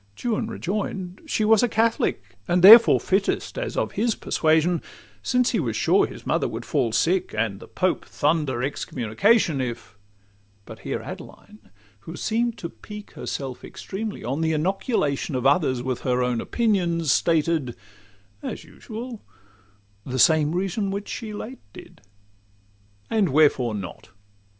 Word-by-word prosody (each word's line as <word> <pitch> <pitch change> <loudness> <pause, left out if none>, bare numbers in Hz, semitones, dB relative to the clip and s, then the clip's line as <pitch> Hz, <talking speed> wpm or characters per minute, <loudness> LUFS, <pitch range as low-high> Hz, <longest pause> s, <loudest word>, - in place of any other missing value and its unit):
Juan 225 -2 -1
rejoin'd—'She 195 - -3
was 220 -1 +5
a 245 - +2
Catholic, 220 - 0
And 175 0 +2
therefore 225 +4 +10
fittest, 195 +1 -1
as - - -4
of - - 0
his 225 0 0
persuasion; 160 +2 +1 0.4
Since 250 -1 +1
he 225 - 0
was 120 -9 -2
sure - - +3
his - - -11
mother - - +1
would - - -6
fall 115 - 0
sick, 165 +8 +1
And 105 -3 -1
the - - -12
Pope 185 -1 -1
thunder 145 -5 0
excommunication, 140 - +1
If 115 -4 -6 0.3
' 100 0 -36
But - - -11
here - - -4
Adeline, 105 -2 -11 0.3
who 160 +11 -9
seem'd 235 +3 -1
to 170 - -6
pique 210 +4 -11
Herself 130 -3 -6
extremely 210 +2 -6
on 135 +7 -2
the 160 0 +1
inoculation 155 - -1
Of 125 - -2
others 135 -4 +2
with 130 -1 -2
her 125 -1 0
own 125 -2 0
opinions, 175 - 0
stated— 155 -6 +1 0.7
As - - -6
usual—the 105 - -11
same 155 +3 +4
reason 195 +2 -1
which 200 +1 -4
she 225 -3 -5
late 225 +5 -7
did. - - -13 1.1
And 210 -5 +2
wherefore 135 -6 +3
not? 95 -4 -8
160 Hz, 140 wpm, -24 LUFS, 125-210 Hz, 1.1 s, therefore